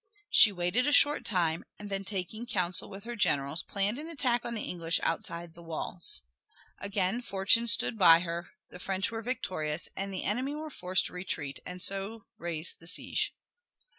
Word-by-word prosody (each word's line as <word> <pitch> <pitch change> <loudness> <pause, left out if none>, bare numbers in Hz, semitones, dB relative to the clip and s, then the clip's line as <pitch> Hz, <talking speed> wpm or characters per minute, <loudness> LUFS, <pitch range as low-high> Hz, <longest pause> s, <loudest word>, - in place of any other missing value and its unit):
She 210 - +9
waited 190 +8 0
a - - +3
short 290 +1 +5
time, 170 -5 +1
and 205 -1 -9
then 195 0 -2
taking 205 +4 -4
counsel 180 -6 0
with 195 0 -9
her 240 +1 -5
generals 145 -6 +2
planned 200 +7 -1
an 315 +2 -7
attack 250 -7 0
on 235 - -3
the 215 - -2
English 170 -1 0
outside 170 0 -2
the 170 - -14
walls. 165 - -2 0.6
Again 200 +2 -1
fortune 215 +2 +3
stood 225 0 +1
by 165 -3 +8
her, 170 0 -4 0.2
the 180 - -10
French 190 +2 -1
were 225 -1 -4
victorious, 185 -10 -2
and 195 +1 -4
the 190 - -4
enemy 255 +8 -1
were 310 0 -6
forced 185 -5 +1
to - - -5
retreat 160 -6 -4
and 180 0 -5
so 200 +3 -1
raise 170 -1 -1
the 165 - -16
siege. - - 0
195 Hz, 180 wpm, -30 LUFS, 170-225 Hz, 0.6 s, She